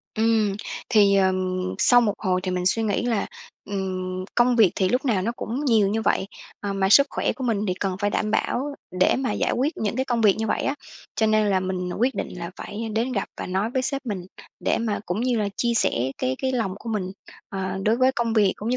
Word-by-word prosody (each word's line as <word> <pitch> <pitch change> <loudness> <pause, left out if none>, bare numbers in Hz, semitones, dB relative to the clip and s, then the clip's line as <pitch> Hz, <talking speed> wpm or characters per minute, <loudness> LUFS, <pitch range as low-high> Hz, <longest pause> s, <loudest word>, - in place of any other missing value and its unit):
Ừm. 220 -2 +2 0.4
Thì, 205 -3 +5
ờ, 190 -1 +4 0.5
sau 245 - +6
một 220 -4 +2
hồi 185 -3 0
thì 185 - -2
mình 180 0 -2
suy 225 +4 +2
nghĩ 210 -3 0
là, 230 -4 0 0.4
ừm, 185 -2 -3
công 245 0 +3
việc 215 -6 +6
thì 190 - +2
lúc 250 +7 0
nào 215 -8 +1
nó 230 +5 -1
cũng 250 +7 -3
nhiều 220 -7 +4
như 220 +2 -1
vậy, 190 - +1 0.3
à, 200 -1 -3
mà 195 -1 +1
sức 280 +8 +7
khỏe - - 0
của 260 +2 -6
mình 225 -4 +1
thì 180 - +1
cần 190 -2 -1
phải 205 0 +1
đảm 215 +1 -1
bảo 275 +6 -1 0.3
để - - +4
mà 260 -1 -1
giải - - 0
quyết 275 +6 0
những 220 +1 -2
cái 260 - +1
công 240 -3 0
việc 210 -3 +5
như 220 - -1
vậy - - 0
á, 275 - 0 0.4
cho 220 - +2
nên 215 0 +3
là 195 -2 +2
mình 185 -1 -3
quyết 250 +4 +2
định - - -3
là 170 0 -5
phải 225 +2 -5
đến 235 +4 0
gặp 200 -5 -2
và - - -4
nói 190 +4 -1
với 255 +1 0
sếp 275 +1 -3
mình, 190 -5 -4 0.4
để - - +2
mà 225 -3 -1
cũng 180 +5 -2
như 250 0 +1
là 210 -1 0
chia 235 -1 +1
sẻ 130 - +1
cái 130 +1 -1
cái 260 0 -1
lòng 225 -7 -1
của 230 - -9
mình, 195 -4 -2 0.4
ờ, 190 -1 -3
đối 220 +3 +2
với 260 +1 +3
công 235 -3 -1
việc 205 -4 +4
cũng 215 - -5
như 250 - +1
215 Hz, 250 wpm, -24 LUFS, 190-240 Hz, 0.5 s, sức